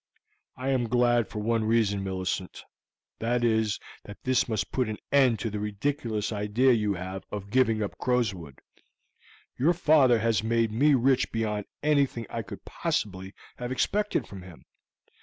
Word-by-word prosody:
"I 130 Hz, +1 st, -3 dB
am 125 Hz, -4 st, +1 dB
glad 120 Hz, -1 st, +3 dB
for 110 Hz, -, -9 dB
one 115 Hz, +1 st, 0 dB
reason, 110 Hz, -3 st, +1 dB
Millicent; 95 Hz, -1 st, -4 dB, 0.6 s
that 120 Hz, +2 st, 0 dB
is, 110 Hz, -2 st, +1 dB, 0.2 s
that 105 Hz, -, -10 dB
this 130 Hz, -1 st, +1 dB
must 105 Hz, -2 st, -2 dB
put 125 Hz, -4 st, 0 dB
an 105 Hz, -, -4 dB
end 130 Hz, -5 st, +4 dB
to 110 Hz, +1 st, -3 dB
the 105 Hz, -, -3 dB
ridiculous 105 Hz, +1 st, -2 dB
idea 105 Hz, +5 st, +2 dB
you 105 Hz, -3 st, +1 dB
have 95 Hz, +1 st, -6 dB
of 100 Hz, -1 st, -6 dB
giving 115 Hz, -4 st, +2 dB
up 100 Hz, -, -6 dB
Crowswood. 100 Hz, -, -1 dB, 1.0 s
Your 155 Hz, +7 st, +4 dB
father 150 Hz, -7 st, +4 dB
has 110 Hz, -2 st, +1 dB
made 115 Hz, 0 st, +1 dB
me 140 Hz, +6 st, +4 dB
rich 130 Hz, +1 st, +2 dB
beyond 105 Hz, -2 st, -2 dB, 0.2 s
anything 140 Hz, -6 st, +1 dB
I -, -, -2 dB
could -, -, -10 dB
possibly 95 Hz, -1 st, -3 dB, 0.2 s
have 125 Hz, 0 st, -5 dB
expected 210 Hz, +10 st, 0 dB
from 95 Hz, -2 st, -10 dB
him. 90 Hz, -3 st, -14 dB
115 Hz, 160 wpm, -27 LUFS, 105-125 Hz, 1.0 s, end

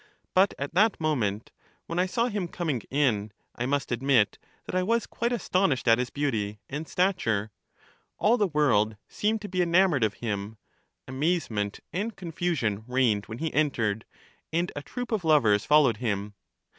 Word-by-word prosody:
But 190 Hz, +2 st, +4 dB
at 140 Hz, +2 st, -4 dB
that 210 Hz, +4 st, +3 dB
moment, 115 Hz, -10 st, -1 dB, 0.3 s
when 170 Hz, +1 st, -3 dB
I 185 Hz, -, +2 dB
saw 235 Hz, +5 st, 0 dB
him 205 Hz, -6 st, -2 dB
coming 160 Hz, -8 st, -2 dB
in, 115 Hz, -7 st, +1 dB, 0.2 s
I 120 Hz, -, -2 dB
must 140 Hz, -1 st, -1 dB
admit 120 Hz, -3 st, +2 dB, 0.3 s
that -, -, -7 dB
I 185 Hz, -, +2 dB
was 230 Hz, +5 st, +1 dB
quite 235 Hz, +1 st, -2 dB
astonished 185 Hz, -, +1 dB
at 115 Hz, +1 st, +6 dB
his 125 Hz, -, -1 dB
beauty 110 Hz, -8 st, -2 dB
and 150 Hz, +3 st, -5 dB
CHARMIDES -, -, -16 dB
9 -, -, -13 dB, 0.2 s
stature; 110 Hz, -, -2 dB, 0.7 s
all 220 Hz, +3 st, +4 dB
the 210 Hz, -4 st, +2 dB
world 120 Hz, -, +2 dB
seemed 215 Hz, +1 st, -1 dB
to -, -, -4 dB
be 185 Hz, -1 st, -1 dB
enamored 175 Hz, -5 st, +3 dB
of 105 Hz, -2 st, +1 dB
him; 105 Hz, -1 st, -4 dB, 0.5 s
amazement 130 Hz, -, -1 dB
and 210 Hz, +5 st, -2 dB
confusion 160 Hz, -, -2 dB
reigned 125 Hz, -5 st, +1 dB
when 110 Hz, -, -6 dB
he 160 Hz, +3 st, -3 dB
entered; 115 Hz, -8 st, 0 dB, 0.5 s
and 170 Hz, +2 st, 0 dB
a 145 Hz, -, -4 dB
troop 245 Hz, -, -6 dB
of 215 Hz, -5 st, 0 dB
lovers 115 Hz, -10 st, +4 dB
followed 145 Hz, -7 st, +4 dB
him. 105 Hz, -3 st, -2 dB
145 Hz, 170 wpm, -27 LUFS, 110-180 Hz, 0.7 s, at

